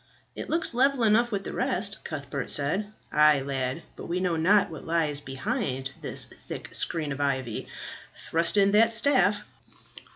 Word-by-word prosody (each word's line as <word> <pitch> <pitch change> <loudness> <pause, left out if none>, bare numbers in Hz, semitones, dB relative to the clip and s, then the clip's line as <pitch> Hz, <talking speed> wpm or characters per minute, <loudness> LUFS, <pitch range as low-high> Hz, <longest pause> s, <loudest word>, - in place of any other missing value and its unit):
"It - - -6
looks 330 -4 0
level 265 0 +2
enough 230 +2 +3
with 200 -2 -2
the - - -6
rest," 195 +2 -2
Cuthbert 140 -3 -4
said. 185 +9 +1 0.2
"Ay, 150 -2 +5
lad, 135 +2 -3
but - - -9
we 175 +2 -1
know 180 -2 0
not 190 +3 +3
what 160 - -8
lies 160 -3 0
behind 135 - -3
this - - 0
thick - - -9
screen 155 -4 0
of 140 +1 -4
ivy. 130 -5 -2 0.5
Thrust 165 +3 0
in 200 0 +5
that 220 +2 +5
staff." 230 -3 +3
170 Hz, 160 wpm, -27 LUFS, 140-210 Hz, 0.5 s, Ay